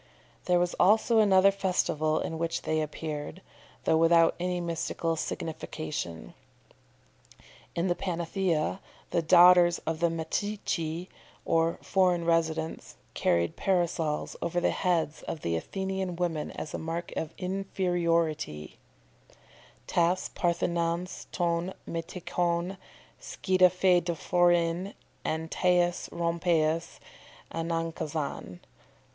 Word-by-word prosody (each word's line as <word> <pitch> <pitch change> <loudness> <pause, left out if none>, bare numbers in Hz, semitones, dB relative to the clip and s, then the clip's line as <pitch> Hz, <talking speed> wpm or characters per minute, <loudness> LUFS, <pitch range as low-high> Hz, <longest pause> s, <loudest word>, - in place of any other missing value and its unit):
There 180 - +3
was 175 0 +1
also 220 +4 +4
another 195 -2 +6
festival 160 -5 0
in 160 - -4
which 165 0 -2
they 155 0 0
appeared, 155 +1 -5 0.4
though 160 - +3
without 165 0 +5
any 180 0 -1
mystical 165 -1 -2
signification. 150 - -5 1.4
In 170 - 0
the 175 - +2
Panathenæa, 175 -1 -1 0.3
the 170 - +2
daughters 175 +1 +7
of 160 0 -2
the 170 0 +3
Metceci, 165 0 -2 0.4
or 165 0 +2
foreign 180 -3 +2
residents, 160 -1 -1 0.2
carried 85 0 +1
Parasols 170 -5 0
over 175 +1 0
the - - +2
heads 165 -4 0
of 155 - -5
Athenian 190 - -2
women 170 -3 -2
as 155 - -7
a - - -3
mark 165 +2 -4
of 160 - -3
inferiority, 170 - -1 1.1
"tas 175 +2 +1
parthenons 170 0 -1
ton 175 +1 -1
metoikon 170 +2 -2 0.4
skiadaephorein 175 -1 +2 0.3
en 160 +1 -2
tais 175 0 +1
rompais 170 -1 0 0.5
aenankazon." 165 - -3
170 Hz, 95 wpm, -28 LUFS, 160-180 Hz, 1.4 s, daughters